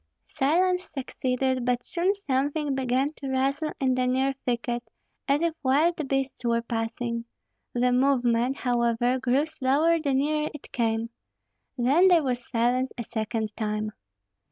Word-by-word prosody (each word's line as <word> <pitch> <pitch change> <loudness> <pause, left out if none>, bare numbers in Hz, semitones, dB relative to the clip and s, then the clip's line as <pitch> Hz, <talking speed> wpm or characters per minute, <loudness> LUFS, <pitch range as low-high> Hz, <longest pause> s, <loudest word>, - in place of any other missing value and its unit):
Silence 360 +6 +1
succeeded; 260 -1 -1
but 245 0 0
soon 360 +2 +1
something 290 -4 -1
began 265 +1 +1
to 275 - -6
rustle 275 +4 0
in 260 -1 +2
the 255 0 +1
near 265 +2 +1
thicket, 240 0 -1 0.5
as 285 +3 +2
if 335 -1 +1
wild 300 +3 +2
beasts 270 -1 -2
were 235 -1 +1
passing. 235 0 -3 0.5
The 250 +1 +2
movement, 250 -1 +2
however, 240 0 +1
grew 260 +3 +2
slower 315 +2 +2
the 280 -4 0
nearer 300 +2 +1
it 295 - -11
came. 230 -1 -1 0.7
Then 280 +10 +4
there 345 -4 +5
was 250 -2 -3
silence 245 +3 +1
a 235 - -3
second 220 -1 -3
time. 215 -1 -2
260 Hz, 140 wpm, -26 LUFS, 240-285 Hz, 0.7 s, there